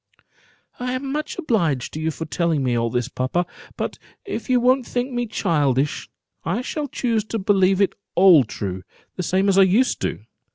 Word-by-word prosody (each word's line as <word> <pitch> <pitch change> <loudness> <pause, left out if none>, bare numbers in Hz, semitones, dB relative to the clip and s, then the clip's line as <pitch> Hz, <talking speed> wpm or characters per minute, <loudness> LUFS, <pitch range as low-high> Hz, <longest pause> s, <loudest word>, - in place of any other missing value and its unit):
"I 250 0 -2
am 270 +1 -3
much 300 +2 -3
obliged 175 - 0
to 155 - -5
you 160 +1 0
for 160 +1 -5
telling 160 -2 0
me 125 -2 +1
all 115 0 +1
this, 120 +1 -1
papa; 140 +6 -1 0.3
but - - -3 0.3
if - - -5
you 250 -1 +4
won't 255 +2 +3
think 250 +2 -2
me 240 -1 -2
childish, 145 - 0 0.3
I 200 +9 -1
shall 295 +2 -3
choose 235 -5 -1
to 225 - -3
believe 195 -2 +3
it 200 - +3 0.2
all 175 -5 +7
true, 95 -4 -5 0.3
the - - -3
same 190 +3 +1
as 195 0 +4
I - - +8
used 200 +8 +3
to - - 0
do. - - -17
190 Hz, 195 wpm, -22 LUFS, 150-245 Hz, 0.3 s, I